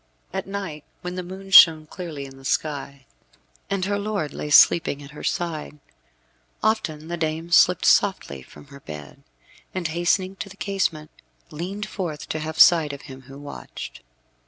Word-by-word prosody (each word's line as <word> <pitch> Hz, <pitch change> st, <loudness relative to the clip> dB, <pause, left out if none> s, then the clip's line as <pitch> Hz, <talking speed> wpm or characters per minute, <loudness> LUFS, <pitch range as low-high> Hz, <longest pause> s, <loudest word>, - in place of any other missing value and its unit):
At -, -, -3 dB
night, 195 Hz, -7 st, -5 dB, 0.2 s
when 180 Hz, 0 st, -4 dB
the 185 Hz, -, -4 dB
moon 190 Hz, +2 st, -9 dB
shone 160 Hz, -5 st, +9 dB
clearly 155 Hz, -4 st, -7 dB
in 135 Hz, 0 st, -12 dB
the 135 Hz, -, -15 dB
sky, 140 Hz, -1 st, -3 dB, 0.6 s
and 195 Hz, -2 st, -1 dB
her 205 Hz, +1 st, -1 dB
lord 200 Hz, -8 st, -3 dB
lay 150 Hz, -, -5 dB
sleeping 145 Hz, -1 st, +5 dB
at 140 Hz, -, -12 dB
her 150 Hz, -, -10 dB
side, 160 Hz, -3 st, -3 dB, 0.9 s
often 160 Hz, -8 st, 0 dB
the 175 Hz, +1 st, -4 dB
dame 160 Hz, +1 st, -3 dB
slipped 180 Hz, +1 st, +5 dB
softly 125 Hz, -, +2 dB
from 65 Hz, -, -15 dB
her 140 Hz, -, -11 dB
bed, 75 Hz, -, -10 dB, 0.5 s
and 175 Hz, -3 st, -2 dB
hastening 185 Hz, +3 st, 0 dB
to 200 Hz, -, -6 dB
the 200 Hz, -, -14 dB
casement, 175 Hz, -7 st, -2 dB, 0.4 s
leaned 185 Hz, +7 st, -5 dB
forth 170 Hz, -8 st, -5 dB
to 155 Hz, -, -2 dB
have 155 Hz, +1 st, -5 dB
sight 160 Hz, -4 st, +6 dB
of 140 Hz, -, -9 dB
him 130 Hz, 0 st, -11 dB
who 135 Hz, -, -10 dB
watched. 145 Hz, -, -9 dB
160 Hz, 165 wpm, -23 LUFS, 150-185 Hz, 0.9 s, shone